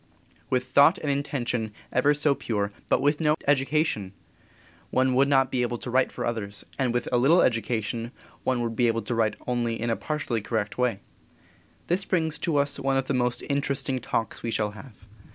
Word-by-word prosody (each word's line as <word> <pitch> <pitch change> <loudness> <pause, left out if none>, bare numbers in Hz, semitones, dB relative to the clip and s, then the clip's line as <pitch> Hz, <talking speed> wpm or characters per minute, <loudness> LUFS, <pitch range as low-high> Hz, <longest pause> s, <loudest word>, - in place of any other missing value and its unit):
With 125 -1 +1
thought 140 +7 +5
and 145 - -1
intention 125 -6 -2 0.2
ever 145 +4 +3
so 150 0 +2
pure, 105 -6 -2 0.2
but - - +2
with 145 +2 +2
no 150 -1 +3
education, 140 - +1 0.8
one 130 +3 +2
would 135 +2 +4
not 135 -2 +3
be 125 - 0
able 120 0 -1
to 120 - -6
write 130 +1 +2
for - - -4
others, 105 -3 -4
and 130 -3 +2
with 120 0 -1
a 125 - +3
little 155 +8 +5
education 115 -1 -1 0.3
one 130 -2 +1
would 115 -1 -3
be 120 0 +3
able 115 -1 0
to 115 - -3
write 115 -2 +1
only 120 -2 -1
in 115 0 -1
a - - +2
partially 145 -7 -2
correct 105 -1 -2
way. 125 -5 0 0.8
This 180 +3 0
brings 160 -5 0
us 145 -4 +1
to - - -7
one 135 0 +1
of 135 - 0
the 140 - -1
most 125 -1 0
interesting 140 -2 0
Talks 115 -1 -3
we 115 - -3
shall 105 -2 0
have. 110 +1 -13
125 Hz, 195 wpm, -26 LUFS, 115-140 Hz, 0.8 s, thought